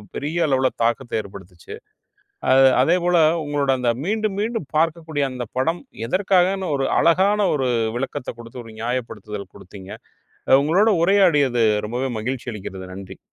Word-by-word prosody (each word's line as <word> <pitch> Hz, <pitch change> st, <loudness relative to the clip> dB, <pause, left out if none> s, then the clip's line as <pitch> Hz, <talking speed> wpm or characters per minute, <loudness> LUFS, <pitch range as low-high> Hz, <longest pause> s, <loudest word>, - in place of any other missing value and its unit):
பெரிய 160 Hz, +4 st, -1 dB
அளவுல 130 Hz, -2 st, +2 dB
தாக்கத்த 120 Hz, 0 st, -1 dB
ஏற்படுத்துச்சு. 95 Hz, -3 st, -12 dB, 0.8 s
அ, -, -, +5 dB, 0.3 s
அதேபோல 175 Hz, +4 st, +2 dB, 0.3 s
உங்களோட 145 Hz, -2 st, 0 dB
அந்த 120 Hz, -1 st, +1 dB
மீண்டும் 215 Hz, 0 st, -1 dB
மீண்டும் 225 Hz, -, -3 dB
பார்க்கக்கூடிய 160 Hz, -2 st, 0 dB
அந்த 125 Hz, -1 st, -5 dB
படம், 165 Hz, +7 st, 0 dB, 0.3 s
எதற்காகன்னு, 190 Hz, +2 st, +1 dB
ஒரு 135 Hz, -, 0 dB
அழகான 195 Hz, +4 st, +3 dB
ஒரு 135 Hz, -3 st, -1 dB, 0.3 s
விளக்கத்த 130 Hz, 0 st, -4 dB
கொடுத்து, 120 Hz, +1 st, -10 dB
ஒரு 115 Hz, -, -11 dB
நியாயப்படுத்துதல் 110 Hz, -5 st, -5 dB
கொடுத்தீங்க. 95 Hz, +1 st, -12 dB, 0.6 s
அ -, -, +5 dB
உங்களோட 185 Hz, +9 st, +3 dB
உரையாடியது 150 Hz, -, +3 dB, 0.2 s
ரொம்பவே 125 Hz, +4 st, -3 dB
மகிழ்ச்சி 125 Hz, +3 st, -4 dB
அளிக்கிறது. 95 Hz, -2 st, -8 dB
நன்றி. 95 Hz, 0 st, -10 dB
135 Hz, 130 wpm, -21 LUFS, 115-175 Hz, 0.8 s, அ